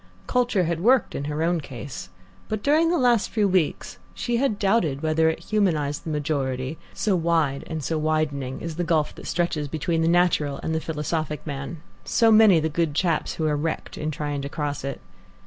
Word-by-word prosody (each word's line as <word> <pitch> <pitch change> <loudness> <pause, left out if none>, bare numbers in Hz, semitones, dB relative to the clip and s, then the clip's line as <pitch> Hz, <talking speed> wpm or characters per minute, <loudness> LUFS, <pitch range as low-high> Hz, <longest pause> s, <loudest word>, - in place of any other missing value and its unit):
Culture 245 -7 +1
had 170 -1 -1
worked 245 +7 +3
in 140 - -3
her 150 +2 -2
own 170 0 +1
case, 120 -9 -8 0.4
but 215 -1 -3
during 310 +3 +4
the 350 - +2
last 240 -6 +3
few 210 -3 +2
weeks 185 -5 0 0.2
she 240 -1 -1
had 245 -5 +1
doubted 195 -9 +1
whether 160 +1 +3
it 160 - -2
humanized 165 -8 0
the - - -4
majority, 140 -2 -2
so 205 -3 0
wide 160 -5 +1
and 160 -2 -4
so 160 +4 -1
widening 150 -4 -1
is 165 -1 -5
the 175 - 0
gulf 160 -3 +1
that - - -10
stretches 165 -4 -1
between 160 +3 -1
the 165 - +2
natural 165 -5 +2
and 160 - -1
the 160 - 0
philosophic 155 -1 -3
man, 150 +2 -6 0.2
so 230 -1 +3
many 215 -5 +7
the 160 - 0
good 160 -1 -1
chaps 165 -2 0
who 160 - -2
are 150 -1 +2
wrecked 155 +2 -3
in 155 - -3
trying 145 -1 -3
to 140 - -5
cross 145 -2 -3
it. 140 0 -4
160 Hz, 200 wpm, -24 LUFS, 145-180 Hz, 0.4 s, many